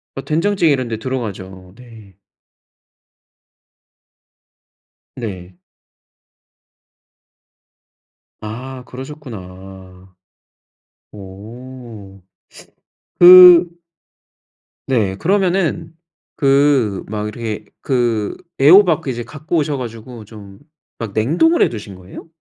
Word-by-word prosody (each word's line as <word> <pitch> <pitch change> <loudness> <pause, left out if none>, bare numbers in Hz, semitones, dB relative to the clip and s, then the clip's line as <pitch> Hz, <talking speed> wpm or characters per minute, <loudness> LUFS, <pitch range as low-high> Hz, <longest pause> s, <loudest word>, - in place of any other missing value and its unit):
어, 135 - -7
된장찌개 165 +1 +1
이런 130 -3 -3
데 110 - -4
들어가죠. 95 -8 -7
네. 115 -6 -16 3.0
네. 95 -7 -8 2.9
아. 125 +4 -8
그러셨구나. 95 - -12 1.0
오. 105 0 -12 1.0
그 180 -1 +9 1.2
네. 110 -8 0
그러면은 175 - -1 0.4
그 135 -7 +1
막 105 0 -4
이렇게 110 -1 -6 0.2
그 120 -5 -1 0.2
애호박 170 +4 +5
그 - - -6
이제 120 -1 -6
갖고 155 +5 -5
오셔 150 -2 -1
가지고 115 -2 -9
좀 100 -2 -14 0.4
막 115 -4 -7
냉동을 170 - +2
해 - - +1
두신 105 -4 -9
거예요? 90 - -13
120 Hz, 155 characters per minute, -17 LUFS, 100-145 Hz, 3.0 s, 그